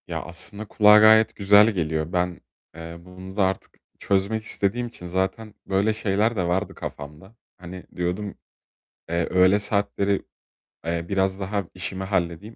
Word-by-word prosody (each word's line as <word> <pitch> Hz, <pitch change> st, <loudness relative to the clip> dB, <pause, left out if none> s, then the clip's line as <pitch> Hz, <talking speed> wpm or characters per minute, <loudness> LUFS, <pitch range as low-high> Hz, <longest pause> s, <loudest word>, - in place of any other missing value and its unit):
Ya, -, -, -4 dB
aslında 100 Hz, +5 st, -5 dB
kulağa 105 Hz, +1 st, +6 dB
gayet 110 Hz, +1 st, +6 dB
güzel 105 Hz, +2 st, +6 dB
geliyor. 80 Hz, -2 st, -2 dB
Ben, 90 Hz, -1 st, -1 dB, 0.3 s
eee, 85 Hz, 0 st, -8 dB
bunu 90 Hz, +2 st, -12 dB
da 100 Hz, -, +2 dB
artık 95 Hz, 0 st, -4 dB, 0.2 s
çözmek 100 Hz, +3 st, 0 dB
istediğim 110 Hz, +3 st, -1 dB
için 90 Hz, -6 st, -11 dB
zaten 95 Hz, +4 st, -2 dB
böyle 100 Hz, +3 st, +1 dB
şeyler 110 Hz, +2 st, 0 dB
de 90 Hz, -4 st, -1 dB
vardı 90 Hz, +2 st, -1 dB
kafamda. 75 Hz, +9 st, -9 dB, 0.2 s
Hani, 90 Hz, +1 st, -10 dB
diyordum: 90 Hz, +3 st, -3 dB, 0.7 s
"Eee, 85 Hz, 0 st, 0 dB
öğle 95 Hz, +2 st, +4 dB
saatleri, 100 Hz, -1 st, 0 dB, 0.6 s
eee, 85 Hz, 0 st, -2 dB
biraz 95 Hz, -1 st, 0 dB
daha 100 Hz, 0 st, -2 dB
işimi 95 Hz, +1 st, -5 dB
halledeyim. 95 Hz, +2 st, -2 dB
95 Hz, 145 wpm, -24 LUFS, 90-105 Hz, 0.7 s, kulağa